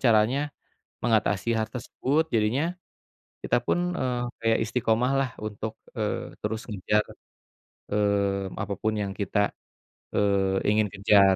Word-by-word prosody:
caranya 125 +4 +3 0.6
mengatasi 110 -1 +2
hal 110 0 +1
tersebut. 135 +6 0
Jadinya, 130 +11 +1 0.7
kita - - +3
pun, 175 +6 0
eee, 125 -4 0 0.2
kayak 115 0 +3
istiqamah 120 +2 +1
lah 135 -2 +1
untuk, 110 +1 -4 0.2
eee, - - -2
terus 110 +2 -2
ngejar, 105 0 +1 0.9
eee, 100 -2 +1
apapun 105 +1 -1
yang 100 -2 -1
kita, 100 0 0 0.6
eee, 100 -1 +2
ingin 105 0 +3
kejar, 100 -1 +5
110 Hz, 115 wpm, -27 LUFS, 100-120 Hz, 0.9 s, kejar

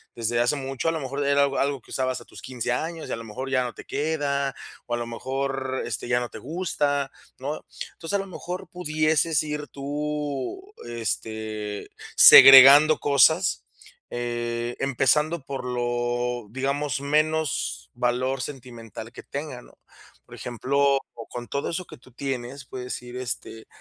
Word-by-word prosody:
desde 120 0 -1
hace 120 +5 +2
mucho, 135 +2 -2
a - - +2
lo 160 - -3
mejor 140 +1 -3
era 140 0 +4
algo 140 -1 0
algo 140 0 0
que - - -19
usabas 130 -1 -1
a - - -14
tus - - -13
15 125 -2 -4
años 160 +6 -3
y - - -5
a - - 0
lo 115 - -8
mejor 130 +5 -6
ya 130 -2 +2
no 120 -1 -5
te - - -11
queda, 140 -2 -1 0.3
o 120 - -1
a - - -3
lo 120 - -3
mejor, 130 +2 -3
este, 115 -1 -4
ya 120 0 +2
no 120 -1 -4
te - - -9
gusta, 145 -3 -1 0.3
¿no? 145 +4 -5 0.3
Entonces, 165 +4 -7
a - - +2
lo 195 - -4
mejor 180 0 -7
pudieses 155 -2 +1
ir 150 -1 -4
tú, 150 - -4
este, 110 -2 -4 0.3
segregando 140 +3 +10
cosas, 155 +5 +3 0.4
eh, 120 0 -3
empezando 140 +4 +1
por 135 -2 -5
lo, 120 -1 -2
digamos, 140 +2 -1
menos 150 - 0
valor 125 +2 0
sentimental 120 -4 -8
que - - -10
tenga, 140 -3 -6
¿no? - - -20 0.5
Por - - -15
ejemplo, 140 +3 +1 0.3
con 120 -1 -7
todo 140 - -2
eso 180 +1 -3
que - - -12
tú 130 +1 -20
tienes, 130 +1 -5
puedes 125 -2 -6
ir, 125 0 -9
este, 120 -2 -6
135 Hz, 165 wpm, -25 LUFS, 120-145 Hz, 0.5 s, segregando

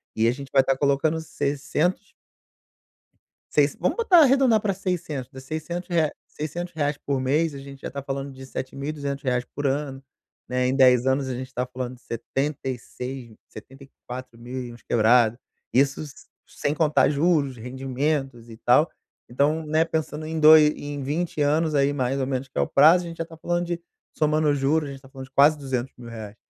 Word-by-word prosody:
E 110 - +2
a - - +4
gente 135 +1 -7
vai 135 - +7
estar 135 0 0
colocando 145 +3 +1
600 150 +5 -2 1.4
seis - - +3
vamos - - 0
botar 400 -7 +5
arredondar 265 -6 +5
para 200 -2 0
600, 150 -9 -4
600 160 +6 -5
rea 160 -3 +2 0.6
reais 145 -1 0
por 140 -2 -2
mês, 150 +4 +1
a - - -7
gente 135 0 -11
já - - -6
tá 140 - -5
falando 135 0 -4
de 130 0 -11
7.200 140 +2 -5
reais 125 -2 0
por 145 -1 -1
ano, 135 -1 -2 0.5
né, 125 0 0
em 130 - +1
10 125 -2 +5
anos 135 0 +1
a 130 - -2
gente 130 +1 -5
está 125 -1 -3
falando 125 0 -6
de 125 - -23
76, 130 -1 -5
setenta 135 +5 -13
e 140 - -17 0.2
quatro 125 -1 -8
mil 125 +2 -6
e 120 - -8
uns 120 - -15
quebrado. 115 0 +3 0.4
Isso, 140 +2 +2
s 145 -3 -11 0.2
sem 145 - -1
contar 150 -4 +3
juros, 145 -3 +1
rendimentos 130 0 -3
e 110 - -11
tal. 130 +8 +4 0.4
Então, 145 +6 +1
né, 155 +2 +2
pensando 155 -1 -3
em 160 0 -3
doi 155 0 +8
em 145 -1 -6
20 155 +4 -2
anos 155 +2 +2
aí 140 0 +3
mais 135 0 -1
ou 130 - 0
menos 135 0 -2
que - - -12
é - - +3
o - - 0
prazo, 165 +5 +5
a - - -6
gente 165 0 -8
já 165 - -3
tá 165 0 -13
falando 175 +2 -1
de, 175 0 -2 0.4
somando 155 0 +2
juros, 145 +2 +1
gente 135 -1 -8
tá 135 - -16
falando 135 -1 -9
de - - -30
quase 145 +3 +6
200.000 130 -3 -5
reais. 110 -2 -8
140 Hz, 190 wpm, -24 LUFS, 130-155 Hz, 1.4 s, doi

